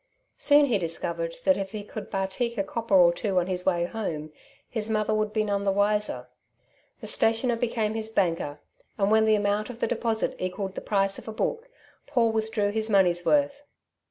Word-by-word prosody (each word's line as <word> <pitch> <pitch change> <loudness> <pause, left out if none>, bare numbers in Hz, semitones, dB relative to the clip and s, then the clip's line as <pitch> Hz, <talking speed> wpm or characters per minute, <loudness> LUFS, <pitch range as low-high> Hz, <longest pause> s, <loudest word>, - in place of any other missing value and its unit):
Soon 290 0 +6
he 235 -7 +1
discovered 165 0 -3
that 285 -1 +4
if 195 0 -5
he 210 -1 -5
could 210 0 -8
batik 195 +5 -2
a 195 - +1
copper 225 +1 -1
or 175 -2 +6
two 195 +1 -2
on 175 - 0
his 180 0 -4
way 175 -2 +2
home 160 -7 -5 0.3
his 220 -1 -2
mother 215 0 +1
would 215 0 0
be 215 0 +1
none 200 -1 -1
the 195 - +2
wiser. 205 -10 0 0.7
The - - -7
stationer 230 +2 +2
became 225 -2 -1
his 220 0 -2
banker, 165 -8 -1 0.4
and 200 -1 +1
when 220 0 +5
the 220 0 +4
amount 205 +1 0
of 245 - -7
the - - 0
deposit 225 -2 -1
equaled 190 +1 -3
the - - -6
price 195 -1 0
of - - -14
a - - -4
book, 465 - -3 0.4
Paul 230 -2 +2
withdrew 220 -2 0
his 220 +1 -1
money's 180 -4 +3
worth. 285 -1 +2
210 Hz, 195 wpm, -26 LUFS, 190-225 Hz, 0.7 s, Soon